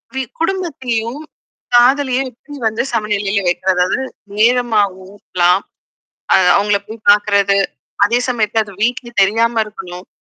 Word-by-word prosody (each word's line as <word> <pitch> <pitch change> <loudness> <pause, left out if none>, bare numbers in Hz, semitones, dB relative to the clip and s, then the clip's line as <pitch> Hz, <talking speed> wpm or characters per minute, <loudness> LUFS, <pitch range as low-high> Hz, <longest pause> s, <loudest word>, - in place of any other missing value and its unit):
We 265 - -1 0.2
குடும்பத்தையும் 270 -9 -2 0.6
காதலிய 260 +1 +4
எப்படி 290 +4 -13
வந்து 220 +1 -1
சமநிலையில 205 -1 -1
வைக்கற. 180 +2 0
அதாவது 180 +8 +1 0.4
நேரமும் 225 -4 +2 0.2
ஊட்டலாம். 180 -1 +1 0.7
அ - - +7 0.2
அவங்கள 200 0 +2
போய் 220 0 -11
பார்க்கறது. 200 -1 +3 0.5
அதே 235 +4 +2
சமயத்து 225 -3 0
அது 200 -2 -11
வீட்லயே 240 0 -2
தெரியாம 225 +3 +2
இருக்கணும். 180 -3 -10
220 Hz, 120 wpm, -16 LUFS, 200-245 Hz, 0.7 s, அ